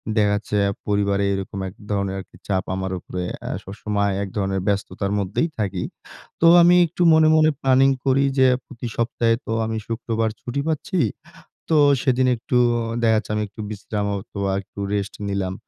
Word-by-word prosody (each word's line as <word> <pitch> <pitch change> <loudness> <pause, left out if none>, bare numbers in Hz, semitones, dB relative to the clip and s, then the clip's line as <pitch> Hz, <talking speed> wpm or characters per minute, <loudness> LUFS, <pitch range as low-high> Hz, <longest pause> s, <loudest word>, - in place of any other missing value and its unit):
দেখা 105 -1 +3
যাচ্ছে 105 0 -2 0.3
পরিবারে 100 -1 +1
এরকম 95 0 -4
এক - - -14 0.2
ধরনের 100 -1 -1
আরকি - - -12
চাপ 95 -2 0
আমার 95 0 -3
উপরে 90 +1 -5 0.2
এ - - -3
সবসময় 100 0 -2
এক - - -4
ধরনের 95 -1 -1
ব্যস্ততার 100 0 -1
মধ্যেই 100 - -1
থাকি। 100 -4 -1 0.6
তো 165 - +6
আমি 175 +1 +6
একটু 175 +2 -6
মনে, 160 0 +5
মনে 155 0 +5
প্ল্যানিং 135 0 +4 0.2
করি 135 +1 +3
যে, 130 - +6 0.2
প্রতি 120 -2 -7
সপ্তাহে 115 0 +1
তো - - -4
আমি 110 0 -2
শুক্রবার 115 -1 -1
ছুটি 125 +3 -3
পাচ্ছি। 160 +4 -1 0.7
তো 160 - +3 0.3
সেদিন 130 -1 +2
একটু 125 +2 -2 0.2
অ - - -1 0.2
দেখা 110 -1 +4
যাচ্ছে 110 - -3
আমি 105 - 0
একটু 110 - -12
বিশ্রাম 105 0 -4
হয়তোবা 100 -1 -3
একটু 100 - -20 0.2
রেস্ট 100 -1 -2
নিলাম। 95 -2 -2
105 Hz, 170 wpm, -22 LUFS, 100-130 Hz, 0.7 s, তো